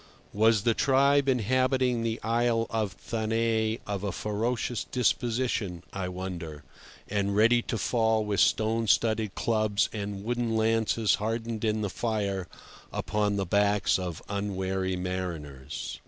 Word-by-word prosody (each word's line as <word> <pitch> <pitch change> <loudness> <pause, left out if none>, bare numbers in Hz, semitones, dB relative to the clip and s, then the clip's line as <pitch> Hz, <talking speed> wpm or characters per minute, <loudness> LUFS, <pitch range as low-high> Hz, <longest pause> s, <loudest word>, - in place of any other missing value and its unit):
Was 110 0 +3
the 115 -1 +3
tribe 140 +2 +3
inhabiting 130 0 +2
the 115 0 -2
Isle 115 0 +1
of 110 -4 -1
Thanet 110 +1 -1
of 100 -1 -3
a 100 - -1
ferocious 115 +4 -2
disposition, 120 -7 -1
I 95 -2 -3
wonder, 85 -5 -6 0.4
and 100 -1 -1
ready 115 +3 +5
to 115 - -3
fall 110 0 +1
with 105 -2 -1
stone 110 +1 +2
studded 110 -1 +2
clubs 110 -3 +1
and 100 -2 -4
wooden 120 0 -1
lances 110 0 +2
hardened 115 0 -2
in 110 -1 +1
the 105 - -1
fire, 100 -5 -2 0.4
upon 105 -1 0
the 100 -1 -1
backs 100 +1 +2
of 90 -3 -5
unwary 95 -2 -2
mariners? 85 -7 -5
110 Hz, 130 wpm, -28 LUFS, 100-115 Hz, 0.4 s, ready